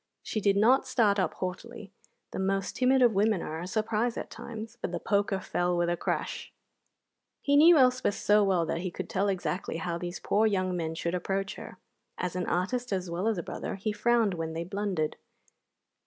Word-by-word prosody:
She 215 - -3
did 200 0 +3
not 255 +6 +4
start 215 -6 +3
up 185 -4 0
haughtily 195 +3 -6 0.4
(the - - -5
most 195 0 -1
timid 260 0 +4
of 235 -2 +5
women 205 -1 +2
are 160 +1 -5
a 175 - -5
surprise 220 +3 -1
at - - -5
times), 225 -1 -8
but - - -3
the 175 - -3
poker 200 0 +1
fell 175 -1 -1
with 175 0 +1
a - - +1
crash. - - -3 0.9
He 285 - +3
knew 320 +3 +8
Elspeth 255 -5 +3
so 210 0 +3
well 185 -4 +2
that 165 - -2
he 185 +1 -3
could - - -6
tell 195 +1 +1
exactly 185 -2 -2
how 170 +1 -3
these 175 0 -5
poor 215 +2 +2
young 185 -3 0
men 160 -2 -3
should 170 +1 -2
approach 195 +2 -2
her. - - -10 0.4
As 180 -1 -3
an 180 -1 -2
artist 245 +8 -1
as 185 -3 -2
well 180 +5 -1
as 225 -3 +1
a 175 - -3
brother, - - -5
he 205 +3 -2
frowned 225 -1 +2
when 165 -2 -4
they 165 +1 -3
blundered. 185 -4 -2
195 Hz, 200 wpm, -29 LUFS, 180-220 Hz, 0.9 s, knew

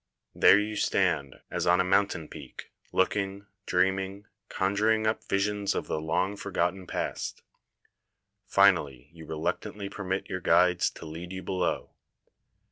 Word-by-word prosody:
There - - +7
you 105 0 -3
stand 70 -8 +1 0.2
as - - -1
on 90 +1 +5
a - - +4
mountain 95 -4 +1
peak, - - -10 0.2
looking, 100 +1 0 0.2
dreaming, 95 +2 0 0.2
conjuring 105 +3 +1
up 110 +1 0
visions 100 0 0
of - - -2
the 75 - -2
long 90 +6 0
forgotten 95 -2 -2
past. - - -4 1.0
Finally 75 -9 +3
you 80 -2 -12
reluctantly 100 +5 -3
per 100 - -7
mit 95 +1 -2
your 90 - -4
guides 90 0 +4
to - - -11
lead 85 +3 -7
you 95 0 -6
below. 90 -2 -1
95 Hz, 135 wpm, -28 LUFS, 85-100 Hz, 1.0 s, There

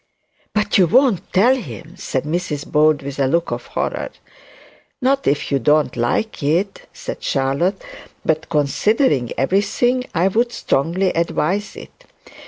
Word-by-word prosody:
'But 210 -1 +2
you 180 - +5
won't 235 - +2
tell 235 +8 +4
him?' 180 - -8
said 135 -8 -3
Mrs 155 -2 -3
Bold 150 -1 +2
with 140 0 -6
a 135 - +3
look 170 +5 0
of - - -4
horror. - - -3 0.9
'Not 270 +1 +1
if 145 +1 0
you 140 - +2
don't 150 +2 +2
like 125 - -1
it,' 170 +8 -1
said - - -7
Charlotte; 140 +9 0 0.4
'but 160 0 0
considering 150 - +1
everything, 205 - +1
I 175 +3 +3
would 235 +4 +1
strongly 170 +7 0
advise 175 +4 -1
it. - - -13
170 Hz, 140 wpm, -19 LUFS, 145-210 Hz, 0.9 s, you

